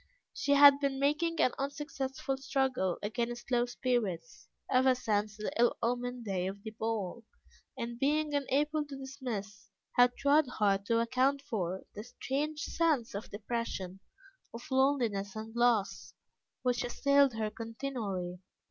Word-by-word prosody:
She 285 Hz, -, +1 dB
had 285 Hz, 0 st, +8 dB
been 280 Hz, -1 st, 0 dB
making 305 Hz, +4 st, +1 dB
an 255 Hz, -, +4 dB
unsuccessful 275 Hz, -1 st, -3 dB
struggle 260 Hz, -9 st, 0 dB
against 240 Hz, +3 st, -3 dB
low 240 Hz, 0 st, +3 dB
spirits, 225 Hz, -10 st, -2 dB, 0.2 s
ever 255 Hz, 0 st, +4 dB
since 215 Hz, -4 st, -1 dB
the 215 Hz, -, -3 dB
ill 240 Hz, -, +4 dB
omened 245 Hz, 0 st, -1 dB
day 185 Hz, -3 st, -1 dB
of 200 Hz, +1 st, -6 dB
the 220 Hz, -, -6 dB
ball, 220 Hz, -1 st, -3 dB, 0.5 s
and 235 Hz, 0 st, -5 dB
being 300 Hz, +2 st, +1 dB
unable 295 Hz, +2 st, +1 dB
to 285 Hz, -2 st, -8 dB
dismiss, 230 Hz, -7 st, -6 dB, 0.3 s
had 245 Hz, 0 st, +6 dB
tried 285 Hz, +1 st, +4 dB
hard 200 Hz, -4 st, +1 dB
to 230 Hz, 0 st, +3 dB
account 260 Hz, +4 st, +1 dB
for, 190 Hz, -9 st, -3 dB
the 210 Hz, -, -7 dB
strange 285 Hz, +5 st, -3 dB
sense 305 Hz, -10 st, 0 dB
of 200 Hz, +2 st, -6 dB
depression, 205 Hz, -3 st, -4 dB, 0.6 s
of 235 Hz, -, -7 dB
loneliness, 240 Hz, -8 st, +1 dB
and 220 Hz, +1 st, -7 dB
loss, 235 Hz, -4 st, +1 dB, 0.5 s
which 250 Hz, -1 st, +1 dB
assailed 280 Hz, +1 st, +3 dB
her 215 Hz, -1 st, -2 dB
continually. 225 Hz, -6 st, -4 dB
245 Hz, 140 wpm, -32 LUFS, 215-275 Hz, 0.6 s, had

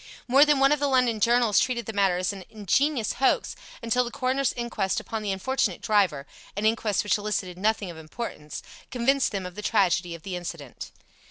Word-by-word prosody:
More 270 Hz, +4 st, +6 dB
than 295 Hz, -2 st, +3 dB
one 275 Hz, +1 st, +5 dB
of 300 Hz, -, +2 dB
the 285 Hz, -, +1 dB
London 250 Hz, -4 st, +2 dB
journals 235 Hz, -1 st, +3 dB
treated 240 Hz, -3 st, -1 dB
the 220 Hz, -, -5 dB
matter 195 Hz, -3 st, +2 dB
as 185 Hz, +2 st, -1 dB
an 195 Hz, -2 st, -9 dB
ingenious 225 Hz, -, 0 dB
hoax, 265 Hz, -, +1 dB, 0.3 s
until 230 Hz, +2 st, +2 dB
the 240 Hz, -, -5 dB
coroner's 260 Hz, +2 st, 0 dB
inquest 235 Hz, -5 st, -2 dB
upon 225 Hz, -1 st, -5 dB
the 205 Hz, -2 st, -2 dB
unfortunate 195 Hz, -1 st, -1 dB
driver 185 Hz, -10 st, +1 dB, 0.3 s
(an 205 Hz, -, -1 dB
inquest 220 Hz, -2 st, +1 dB
which 210 Hz, 0 st, +1 dB
elicited 190 Hz, -4 st, -3 dB
nothing 210 Hz, -2 st, 0 dB
of 165 Hz, -, -12 dB
importance) 155 Hz, -2 st, -7 dB, 0.3 s
convinced 265 Hz, +2 st, +1 dB
them 195 Hz, -3 st, -3 dB
of 180 Hz, -, -7 dB
the 210 Hz, -, -7 dB
tragedy 180 Hz, -5 st, +1 dB
of 165 Hz, -, -13 dB
the 190 Hz, -2 st, -5 dB
incident. 170 Hz, -7 st, -7 dB
215 Hz, 195 wpm, -26 LUFS, 185-245 Hz, 0.3 s, More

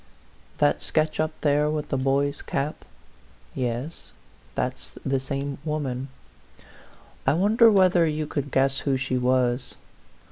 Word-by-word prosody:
THAT -, -, +2 dB
sketch 155 Hz, 0 st, +1 dB
up 155 Hz, 0 st, +2 dB
there 150 Hz, 0 st, +3 dB
with 150 Hz, -1 st, -3 dB
the -, -, 0 dB
boy's 140 Hz, +2 st, 0 dB
cap? 145 Hz, +3 st, -3 dB, 0.7 s
Yes; 125 Hz, +5 st, -4 dB, 0.4 s
that's -, -, -3 dB
the 135 Hz, 0 st, +1 dB
same 140 Hz, +1 st, -4 dB
woman. 140 Hz, -4 st, -3 dB, 1.2 s
I 135 Hz, -, +5 dB
wonder 220 Hz, +6 st, +5 dB
whether 185 Hz, -4 st, +4 dB
you 155 Hz, 0 st, -1 dB
could 145 Hz, -1 st, -3 dB
guess 135 Hz, +1 st, +2 dB
who 135 Hz, -2 st, 0 dB
she 130 Hz, -1 st, -1 dB
was. 125 Hz, 0 st, +1 dB
140 Hz, 130 wpm, -25 LUFS, 135-155 Hz, 1.2 s, I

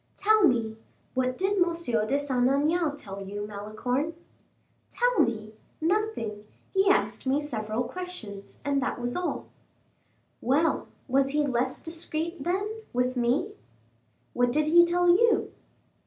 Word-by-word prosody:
"Tell 430 Hz, 0 st, +4 dB
me, 225 Hz, -4 st, 0 dB, 0.4 s
what 255 Hz, -1 st, 0 dB
did 390 Hz, +2 st, +1 dB
M. -, -, +7 dB, 0.4 s
de 275 Hz, -, +2 dB
Saint 260 Hz, -3 st, +1 dB
Aignan 300 Hz, +3 st, +2 dB
tell 195 Hz, -7 st, -8 dB
you, 205 Hz, +1 st, -5 dB
Malicorne?" 215 Hz, +9 st, -3 dB, 0.7 s
"Tell -, -, +1 dB
me? 215 Hz, -2 st, +1 dB, 0.3 s
nothing; 320 Hz, -, -1 dB, 0.3 s
he 390 Hz, 0 st, +4 dB
asked 390 Hz, -, +1 dB
me 270 Hz, +2 st, +3 dB
several 225 Hz, -5 st, -2 dB
questions, 240 Hz, -, -7 dB
and 280 Hz, -1 st, +1 dB
that 255 Hz, -, -2 dB
was 245 Hz, 0 st, -2 dB
all." 360 Hz, 0 st, -3 dB, 0.9 s
"Well, 290 Hz, +7 st, +2 dB, 0.2 s
was 270 Hz, +1 st, +2 dB
he 295 Hz, +1 st, +1 dB
less 260 Hz, -1 st, 0 dB
discreet, 325 Hz, -1 st, -4 dB
then, 410 Hz, +6 st, -2 dB
with 250 Hz, +1 st, +1 dB
me." 245 Hz, +1 st, +1 dB, 0.8 s
"What 245 Hz, 0 st, +2 dB
did 305 Hz, +3 st, +2 dB
he 345 Hz, +3 st, +7 dB
tell 350 Hz, +1 st, +2 dB
you?" 450 Hz, +7 st, +4 dB
275 Hz, 135 wpm, -27 LUFS, 240-345 Hz, 0.9 s, M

